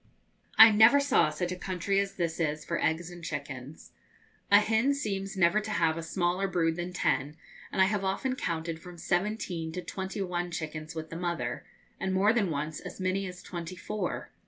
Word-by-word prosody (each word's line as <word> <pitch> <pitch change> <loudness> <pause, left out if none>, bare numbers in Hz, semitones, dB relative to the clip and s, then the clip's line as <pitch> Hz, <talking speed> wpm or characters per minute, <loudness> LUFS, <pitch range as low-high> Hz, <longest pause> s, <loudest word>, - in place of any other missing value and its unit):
I 225 0 +11
never 220 +6 +7
saw 280 -1 +3
such 180 -1 -3
a - - -2
country 185 +1 -1
as 200 0 -2
this 170 -2 -2
is 155 -1 -1
for 170 - -2
eggs 165 +2 0
and 175 -1 -11
chickens. 140 -2 -6 0.6
A 205 - +8
hen 225 +6 +2
seems 195 -6 -3
never 175 +3 +4
to 215 +1 -6
have 165 -6 +2
a 165 - -4
smaller 175 +3 0
brood 165 -3 +1
than 175 +1 -3
ten, 150 -4 0 0.3
and 190 - +4
I - - +6
have 200 0 0
often 195 +7 -1
counted 165 -6 -3
from 180 -1 -11
seventeen 175 -2 -1
to 180 - -3
twenty 190 +1 -4
one 175 -1 -2
chickens 155 -1 -5
with 160 -1 -6
the 165 - -5
mother, 175 -1 -3 0.3
and, 190 0 -1
more 205 +4 +4
than 210 -6 +1
once, 150 0 -3
as - - -9
many 190 +1 0
as 180 0 -9
twenty 175 0 -6
four. 205 +3 -4
180 Hz, 195 wpm, -29 LUFS, 165-195 Hz, 0.6 s, I